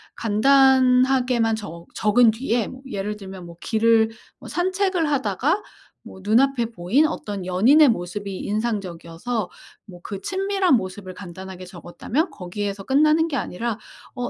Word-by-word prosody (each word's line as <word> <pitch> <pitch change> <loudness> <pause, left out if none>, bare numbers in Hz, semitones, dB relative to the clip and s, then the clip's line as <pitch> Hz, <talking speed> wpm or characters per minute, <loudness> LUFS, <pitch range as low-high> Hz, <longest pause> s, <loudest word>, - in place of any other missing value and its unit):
간단하게만 255 0 +3
적 170 -5 -9
적은 220 +2 +4
뒤에 230 -1 -1
뭐 255 - -10
예를 210 -1 -4
들면 190 -3 -9
뭐 170 -1 -12
길을 225 +2 +2 0.3
뭐 - - -11
산책을 370 -2 0
하다가 270 - 0 0.4
뭐 190 - -12
눈앞에 240 +3 +2
보인 225 - +1
어떤 205 - -5
연인의 250 - +5
모습이 195 -1 -3
인상적이어서 205 -1 -3 0.4
뭐 180 -3 -13
그 200 -2 -6
친밀한 385 - +1
모습을 185 -2 -4
간단하게 185 0 -9
적었다면 190 - -3
거기에서 200 +2 -5
끝나는 305 +6 +3
게 310 - -4
아니라 230 +1 -3 0.4
'어 245 -1 -3
220 Hz, 305 characters per minute, -22 LUFS, 190-265 Hz, 0.4 s, 연인의